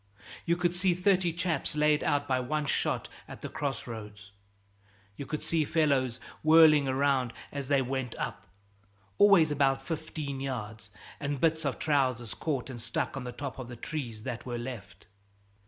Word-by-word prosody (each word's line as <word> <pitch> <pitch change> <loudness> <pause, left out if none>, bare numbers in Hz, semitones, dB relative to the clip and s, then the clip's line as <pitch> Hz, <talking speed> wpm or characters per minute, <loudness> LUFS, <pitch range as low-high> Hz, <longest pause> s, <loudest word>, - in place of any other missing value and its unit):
You 170 0 +3
could 175 -1 +1
see 180 0 +2
thirty 180 -1 +2
chaps 170 -4 -1
laid 150 0 +3
out 145 -1 +1
by 130 -1 +2
one 150 +4 -1
shot - - 0 0.2
at - - -10
the - - -4
cross 140 -3 -3
roads; 105 -3 -9 0.8
you 140 - -7
could 155 - -3
see 165 -2 +1
fellows 140 -6 +1 0.2
whirling 155 -2 +7
around 130 -2 +1 0.2
as 140 -2 -4
they 140 -1 +3
went 130 -1 -3
up, 100 -3 -5 0.7
always 195 -7 +6
about 135 -2 +2
fifteen 155 -3 -4
yards, 110 -6 -5 0.3
and 145 -1 -2
bits 160 +1 +2
of 140 - -1
trousers 130 -6 +1
caught 140 -6 -2
and 120 -2 -7
stuck 115 +3 -2
on 135 -2 -5
the 125 - -4
tops 135 +2 -6
of 130 - -6
the 120 - -8
trees 120 -5 -5
that 120 -2 -4
were 120 -1 -4
left. 105 -7 -8
140 Hz, 170 wpm, -30 LUFS, 125-155 Hz, 0.8 s, whirling